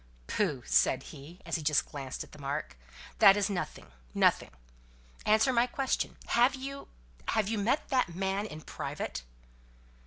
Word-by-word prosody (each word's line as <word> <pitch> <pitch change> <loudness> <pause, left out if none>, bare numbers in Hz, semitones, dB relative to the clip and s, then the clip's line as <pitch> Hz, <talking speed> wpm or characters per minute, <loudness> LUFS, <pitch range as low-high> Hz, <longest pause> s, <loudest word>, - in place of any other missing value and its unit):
"Pooh!" 150 - -1
said 130 0 +3
he, 155 +5 -12
as - - -1
he - - -6
just 150 -1 +2
glanced 135 -3 -6
at - - -16
the - - -13
mark, 140 - -3 0.4
"that 195 +1 +8
is 205 0 +1
nothing 180 - -5 0.2
nothing. - - +3 0.8
Answer 220 +5 +4
my 240 +1 +4
question. 265 +1 -1
Have 245 +3 +4
you 275 +1 -7 0.4
have 215 -3 +1
you 220 0 -1
met 240 +9 0
that 250 - +1
man 195 +2 -1
in 155 -5 -9
private?" 65 - -5
195 Hz, 155 wpm, -30 LUFS, 150-235 Hz, 0.8 s, that